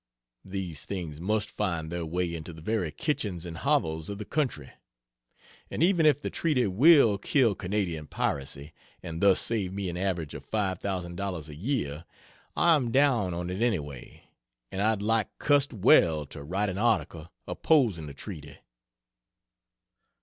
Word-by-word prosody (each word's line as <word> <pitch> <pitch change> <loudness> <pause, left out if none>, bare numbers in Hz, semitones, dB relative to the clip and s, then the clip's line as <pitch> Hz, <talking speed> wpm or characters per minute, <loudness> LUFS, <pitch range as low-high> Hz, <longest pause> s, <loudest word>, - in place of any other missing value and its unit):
These 95 -5 -5
things 85 -6 -5
must 105 +3 0
find 85 -6 -2
their 85 -1 -3
way 85 +1 -1
into 85 +1 -6
the 80 - -11
very 105 -4 0
kitchens 95 - -2
and 85 -1 -6
hovels 80 0 0
of 100 - -4
the 105 - -6
country..... 125 - -2 1.0
And - - -1
even 170 -3 +4
if 145 -2 +4
the - - -4
treaty 145 -7 +1
will 115 - +5
kill 120 0 +3
Canadian 90 -5 -2
piracy, 70 +2 -3 0.3
and 85 -2 -5
thus 100 -2 +5
save 100 -5 -1
me 100 -2 -3
an 85 - -5
average 90 -5 -2
of - - -8
$5,000 95 -4 -3
a 75 - -9
year, 85 - -2 0.5
I 170 - +5
am 135 -6 +1
down 120 -10 +3
on 90 +1 -3
it 95 +4 -4
anyway, 75 - -3 0.5
and 95 - -3
I'd 110 -1 +1
like 110 0 0
cussed 145 -1 +2
well 85 - +4
to 70 +1 -10
write 95 +8 -1
an 95 +1 -4
article 85 -8 0 0.2
opposing 115 - +2
the 70 - -9
treaty." 75 -6 -9
95 Hz, 155 wpm, -28 LUFS, 80-110 Hz, 1.0 s, will